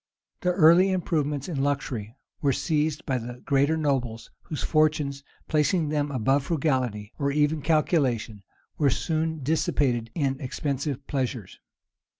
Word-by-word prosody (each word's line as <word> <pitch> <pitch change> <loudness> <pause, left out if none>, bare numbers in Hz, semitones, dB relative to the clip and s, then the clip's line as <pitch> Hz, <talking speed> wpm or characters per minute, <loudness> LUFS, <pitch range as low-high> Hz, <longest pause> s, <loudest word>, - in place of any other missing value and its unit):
The 180 - +1
early 175 +2 +6
improvements 150 -6 -1
in 155 -7 -2
luxury 130 -6 -2 0.3
were 140 -2 +2
seized 150 +1 -1
by 130 -2 0
the 120 +1 -7
greater 140 +3 +2
nobles, 130 -7 -1
whose 155 - -5
fortunes, 150 -3 +1 0.2
placing 155 +1 +1
them 150 -1 0
above 135 +1 +1
frugality, 130 -10 -1
or 140 -1 +1
even 150 +1 +1
calculation, 140 - +1 0.4
were 145 -3 +4
soon 160 +2 -1
dissipated 130 -5 +1
in 135 -4 -1
expensive 140 0 -3
pleasures. 125 -7 -3
145 Hz, 130 wpm, -26 LUFS, 130-155 Hz, 0.4 s, early